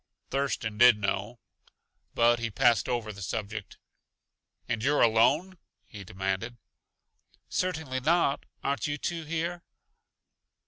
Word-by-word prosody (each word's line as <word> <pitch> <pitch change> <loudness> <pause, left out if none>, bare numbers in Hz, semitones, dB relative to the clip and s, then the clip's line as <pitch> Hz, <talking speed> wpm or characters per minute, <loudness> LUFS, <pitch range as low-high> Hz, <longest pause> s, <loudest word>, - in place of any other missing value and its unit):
Thurston 130 -6 -2
did 120 -2 +8
know, 105 +3 -2 0.8
but 120 +1 +4
he 115 0 -2
passed 120 -1 +2
over 115 -3 -2
the 100 - -11
subject. 105 0 -5 0.9
"And 115 - -2
you're 145 +2 +3
alone?" 140 +12 +3 0.3
he 105 -2 -10
demanded. 95 +5 -3 0.9
"Certainly 160 -8 -2
not; 150 0 +1 0.2
aren't 140 +3 -1
you 145 0 -2
two 165 +2 -4
here?" 165 +2 -3
120 Hz, 110 wpm, -28 LUFS, 110-150 Hz, 0.9 s, did